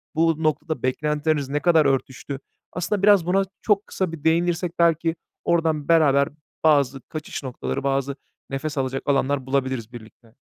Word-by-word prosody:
bu 160 0 +2
noktada 155 -2 -1
beklentileriniz 150 +1 0
ne 145 - 0
kadar 160 0 +4
örtüştü? 135 0 -1 0.3
Aslında 185 +3 -2
biraz 200 -4 +6
buna 195 +2 +2 0.2
çok 210 -1 +1
kısa 185 -3 -2
bir 165 -3 -9
değinirsek 170 +1 +1
belki 165 -1 +3 0.3
oradan 160 -3 +1
beraber 145 -4 +4 0.3
bazı 140 -4 +3
kaçış 155 -2 -6
noktaları, 130 +1 -4
bazı 135 0 0 0.3
nefes 145 +2 -4
alacak 135 0 -1
alanlar 140 -1 +1
bulabiliriz 130 -4 -1
birlikte. 115 0 -14
150 Hz, 145 wpm, -23 LUFS, 135-165 Hz, 0.3 s, biraz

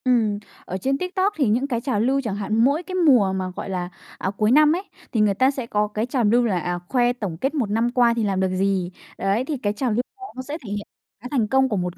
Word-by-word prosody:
Ừm, 225 -5 +2 0.3
ở 185 - -4
trên 270 +7 0
TikTok 375 +4 0
thì 280 -6 +2
những 245 +6 +1
cái 240 -4 -1
trào 250 -5 -1
lưu 265 +5 +2
chẳng 220 -6 -3
hạn, 210 +1 -2
mỗi 285 +7 +2
cái 370 +1 -6
mùa 255 - +4
mà, 190 -1 -2
gọi - - -5
là, 180 -2 -3 0.3
à, - - -2
cuối 210 +3 +1
năm 305 +3 +6
ấy, 360 - -2 0.3
thì 225 - 0
người 210 -1 +3
ta 260 +7 +3
sẽ 265 -3 -5
có 210 -1 +1
cái 215 +2 -2
trào 250 -1 -1
lưu 235 +3 +4
là, 190 -6 +1
à, 175 +1 -2
khoe 245 -1 +2
tổng 205 -9 -5
kết 270 - -1
một 255 -9 -1
năm 225 +3 +1
qua 240 -2 +4
thì 230 -1 -1
làm 195 -2 0
được 190 0 +1
gì. 190 -2 0 0.3
Đấy, 200 +6 0
thì 295 0 -2
cái 205 -4 -1
trào 245 +2 -1
lưu 220 +3 +2 0.2
đó 390 - -13
nó 260 - -4
sẽ 290 +4 -5
thể - - -7
hiện 205 0 -4 0.3
cái 250 - -7
thành 240 -7 +1
công 265 +2 +3
của 210 - 0
một 180 -1 -3
230 Hz, 280 wpm, -23 LUFS, 205-265 Hz, 0.3 s, năm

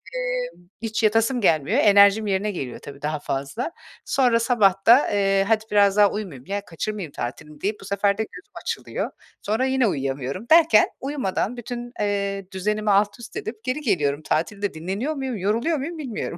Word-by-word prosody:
emm, - - -4
hiç 225 0 -2
yatasım 225 +4 +2
gelmiyor. 165 - +2
Enerjim 205 -1 +6
yerine 200 +2 0
geliyor 135 -10 -5
tabii 140 0 -11
daha 150 0 -2
fazla. 140 - -3 0.3
Sonra 245 -4 +3
sabah 205 -5 +2
da, 245 +5 +7
eee, 195 -1 +2
hadi 220 0 +2
biraz 200 -1 +4
daha 205 -1 +6
uyumayayım 175 -12 -6
ya, 200 +1 -3
kaçırmayayım 180 -1 -5
tatilimi 150 +5 -7
deyip 205 +2 -2
bu - - -10
sefer 200 0 +1
de 220 - 0
gözüm - - -13
açılıyor. - - -3 0.3
Sonra 220 +5 0
yine 260 -3 +2
uyuyamıyorum 135 - -3
derken 320 -10 +6
uyumadan 250 -4 -2
bütün, 240 0 -6
eee, 200 -1 -1
düzenimi 210 +2 -1
altüst 205 +3 0
edip 220 0 -6
geri 255 +5 -2
geliyorum. 150 - 0
Tatilde 200 +6 -1
dinleniyor 195 - -3
muyum, 265 -5 -3
yoruluyor 230 - 0
muyum 320 +5 -5
bilmiyorum. 240 - -5
205 Hz, 165 wpm, -23 LUFS, 190-240 Hz, 0.3 s, da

